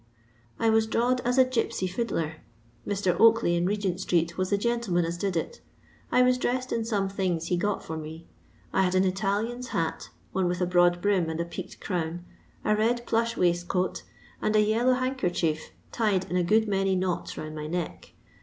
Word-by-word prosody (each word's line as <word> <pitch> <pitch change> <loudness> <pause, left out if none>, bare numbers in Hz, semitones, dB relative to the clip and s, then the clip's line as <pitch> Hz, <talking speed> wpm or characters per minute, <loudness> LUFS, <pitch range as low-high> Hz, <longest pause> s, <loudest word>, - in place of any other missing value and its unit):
I 225 - +3
was 220 0 +3
drawed 245 +3 +1
as 245 +2 0
a 260 - +7
gipsy 240 -6 -1
fiddler. 180 -6 -2 0.5
Mr. 195 -3 +1
Onkley 225 -5 +5
in 175 +1 +1
Regent 195 -3 -1
street 170 -2 0
was 185 0 -1
the 200 - +2
gentleman 215 -6 0
ns 170 +1 -3
did 185 0 -1
it. 480 - -4 0.5
I 250 - +5
was 250 0 +3
dressed 255 +1 -1
in 230 - 0
some 205 -4 0
things 185 -4 -2
he 180 - +2
got 205 +3 -1
for 160 - -5
me. 160 +1 -8 0.5
I - - +3
had 185 -1 +1
an 185 - +4
Italian's 210 +6 -1
hat, 165 -7 -2 0.2
one 190 -1 +1
with 175 0 -1
a 180 - +2
broad 175 0 +3
brim 195 -5 +2
and 160 0 -4
a 170 - 0
peaked 170 - -8
crown, 175 -2 -3 0.4
a 210 - +3
red 235 +3 +1
plush 230 +1 0
waistcoat, 175 +1 0 0.4
and 215 - +1
a 215 - +6
yellow 230 +4 +3
hankercher 180 - 0 0.3
tied 205 -5 +1
in - - -1
a 180 - +2
good 220 +5 +3
many 195 -1 +1
knots 185 -1 -2
round 155 0 -6
my 155 -1 -5
n«?ck. 170 +1 -5
190 Hz, 190 wpm, -27 LUFS, 175-225 Hz, 0.5 s, a